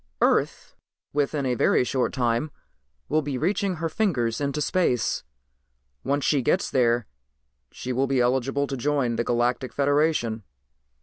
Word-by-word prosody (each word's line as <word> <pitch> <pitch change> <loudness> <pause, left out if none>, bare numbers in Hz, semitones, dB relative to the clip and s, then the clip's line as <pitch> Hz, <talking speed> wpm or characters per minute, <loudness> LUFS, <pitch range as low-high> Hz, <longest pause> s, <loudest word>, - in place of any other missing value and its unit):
"Earth, - - +1 0.4
within 145 0 0
a 125 - +1
very 125 - +3
short 125 0 0
time, 120 +3 0 0.6
will 155 +1 +1
be 140 -3 -3
reaching 190 - 0
her 165 0 -2
fingers 145 - 0
into 140 +1 -1
space. 150 -5 0 0.8
Once 140 0 0
she 145 -3 +2
gets 180 +9 +1
there 120 -3 +2 0.7
she 125 - -5
will 135 +2 +1
be 135 -1 +1
eligible 130 +3 +1
to 140 - -4
join 135 -2 0
the 120 - 0
Galactic 120 +1 0
Federation." 145 -5 +1
135 Hz, 140 wpm, -25 LUFS, 120-150 Hz, 0.8 s, very